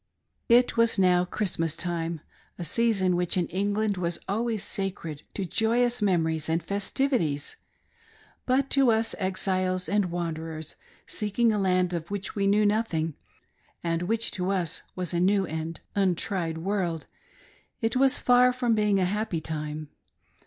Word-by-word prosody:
It 240 0 +4
was 230 -2 +3
now 180 -2 +4
Christmas 170 -5 -2
time 170 -2 -3 0.2
— - - -34
a 175 - -4
season 195 -3 +2
which 175 +1 +1
in 175 - +2
England 205 +2 0
■was 170 -1 -1
always 220 +1 -1
sacred 180 -6 -4
to 195 - -2
joyous 235 +4 +1
memories 160 -5 +1
and 165 0 0
festivities; 200 - -1 0.9
but 265 +1 +2
to 275 -3 +4
us, 225 0 +1
exiles 185 -1 0
and 205 -1 +2
wanderers, 160 -2 -4 0.3
seeking 220 +2 +1
a 210 - 0
land 185 -2 +2
of 170 -1 -4
which 200 -1 -4
we 200 -1 0
knew 210 +1 +4
nothing, 205 -7 0 0.7
and 165 0 0
which 225 +5 -1
to 180 0 -2
us 185 -4 0
was 180 -1 -2
a 170 - +1
new 195 +2 +3
and 160 0 -5
untried 180 -3 0
world, 175 -2 -2 0.7
it 225 +1 0
was 265 +1 +5
far 250 0 +5
from 250 -2 0
being 210 -2 +2
a 185 - +2
happy 205 -2 -1
time. 150 -1 -5
190 Hz, 150 wpm, -27 LUFS, 170-215 Hz, 0.9 s, was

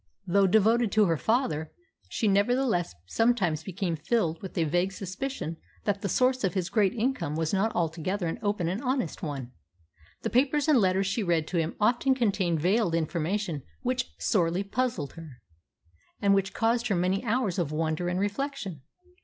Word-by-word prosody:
Though 195 +1 +3
devoted 220 +3 +3
to 215 -1 +5
her 165 -3 +2
father, 160 - 0 0.4
she 220 - 0
nevertheless 205 - +2
sometimes 195 - +1
became 180 0 -3
filled 165 0 0
with 190 - -8
a 165 - +3
vague 175 +5 +1
suspicion 190 - -4 0.3
that 200 -1 -1
the 200 - -2
source 255 +5 +2
of 190 0 0
his 185 -1 -1
great 205 -3 +2
income 220 - -1
was 160 +1 -1
not 205 +3 +2
altogether 175 +3 -1
an 165 - -3
open 205 -4 0
and 190 +7 -2
honest 255 - -1
one. 135 -6 -5 0.7
The - - -2
papers 285 +4 +2
and 300 -5 +5
letters 190 -1 +2
she 200 +4 -1
read 170 -5 +1
to 180 - -1
him 165 0 -1
often 240 +5 +3
contained 195 -9 +1
veiled 190 0 +2
information 165 0 -1 0.2
which 250 0 -1
sorely 180 -2 +1
puzzled 200 - -2
her, 165 -4 -10 0.9
and 200 -1 +3
which 195 0 +1
caused 235 +2 +1
her 205 - +1
many 185 +4 +1
hours 225 -5 0
of 160 -4 -1
wonder 160 +2 -1
and 180 +1 -1
reflection. 205 - -3
195 Hz, 170 wpm, -28 LUFS, 170-230 Hz, 0.9 s, to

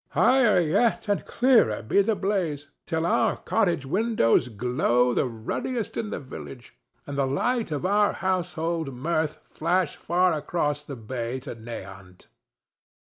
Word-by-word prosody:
Higher 250 -6 +4
yet, 200 +9 +1
and 205 -1 0
clearer, 235 - +3
be 155 - +3
the 215 +2 +1
blaze, 180 -8 -2 0.2
till 160 0 -1
our - - +2
cottage 175 -10 0
windows 185 - +2
glow 125 +1 +1
the 130 - +1
ruddiest 125 - -4
in 220 - -3
the - - -4
village 130 -2 -10 0.3
and 140 0 -4
the 135 - +2
light 230 - 0
of 150 +2 -3
our 205 +2 +3
household 170 -5 -2
mirth 155 +3 -1
flash 170 0 -1
far 180 0 +1
across 150 -1 -1
the 145 -1 -7
bay 120 +2 -4
to 130 -1 -7
Nahant. 100 -5 -10
155 Hz, 140 wpm, -26 LUFS, 125-190 Hz, 0.3 s, Higher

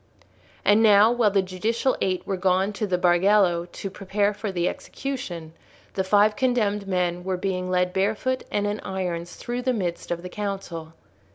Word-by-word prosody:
And 205 +2 +5
now, 215 0 +6
while 240 -3 +3
the 195 -1 +2
judicial 220 +8 0
Eight 185 -1 0
were 195 - -1
gone 190 +2 +1
to 210 +1 -2
the 180 -2 +1
Bargello 175 0 +3
to 195 - -6
prepare 200 +2 0
for 205 0 -4
the 175 -1 0
execution, 175 -13 -5 0.4
the 190 - 0
five 205 +2 +4
condemned 210 -6 0
men 180 -2 0
were 185 0 -1
being 185 -1 -2
led 180 0 +1
barefoot 215 +7 0
and 205 0 0
in 205 +1 -2
irons 175 -2 -4
through 245 0 -4
the 255 0 +1
midst 180 -6 -3
of 170 0 -3
the 180 - -6
council. 190 -6 -5
195 Hz, 175 wpm, -25 LUFS, 180-210 Hz, 0.4 s, now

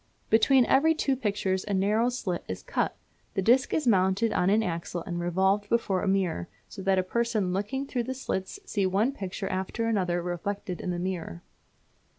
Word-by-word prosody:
Between 250 +3 +5
every 320 +4 +4
two 275 -3 +1
pictures 200 -6 -1
a 205 - -1
narrow 210 +5 +2
slit 195 -8 -3
is 95 - -5
cut. - - -1 0.4
The 195 - 0
disc 250 +5 +4
is 310 - 0
mounted 195 0 +3
on 180 - +2
an 215 +2 +3
axle 170 -1 -3
and 175 -1 -3
revolved 190 +4 +1
before 205 -5 +1
a - - -2
mirror, 185 - 0 0.2
so 195 - -9
that 190 0 +2
a 185 - +3
person 215 -2 0
looking 235 +8 -2
through 245 -3 -2
the 260 +2 -3
slits 215 - -4
see 200 - 0
one 205 +7 +2
picture 195 -5 -5
after 190 +5 -2
another 185 -6 +1
reflected 180 +1 -4
in - - -4
the 175 - -1
mirror. 175 - -4
195 Hz, 185 wpm, -28 LUFS, 185-230 Hz, 0.4 s, Between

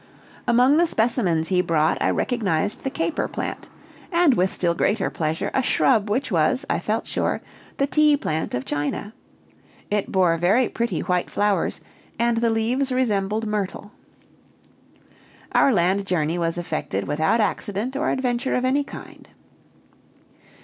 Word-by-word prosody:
Among 250 +5 +4
the 345 +1 +4
specimens 220 - +1
he 180 -1 +3
brought 160 -3 +1
I - - +2
recognized 205 -5 -1
the 270 - -2
caper 325 +3 -2
plant, - - -5 0.4
and, 340 -5 +4
with 185 -3 +1
still 170 -2 0
greater 205 +5 0
pleasure, 160 0 -2
a 265 - +2
shrub 225 -4 +2
which 255 +4 -1
was, 180 +10 +1
I - - +1
felt - - -2
sure, - - -1 0.4
the 275 - +2
tea 300 0 +4
plant 160 - -2
of 125 - -4
China 145 +8 -3 0.8
it 205 -1 -1
bore 180 -3 +3
very 200 +9 +2
pretty 235 0 -2
white 180 -1 -1
flowers, 205 -1 0 0.4
and 235 0 +1
the 230 0 +2
leaves 240 +5 0
resembled 215 -4 0
myrtle. 205 -1 -3 1.6
Our 275 - +4
land 195 0 +1
journey 165 -1 0
was 165 0 -1
effected 165 - -3
without 160 +10 +1
accident 210 +3 -2
or - - 0
adventure 250 0 -1
of 250 - 0
any 275 +3 +2
kind. 275 - -12
210 Hz, 145 wpm, -23 LUFS, 175-255 Hz, 1.6 s, Among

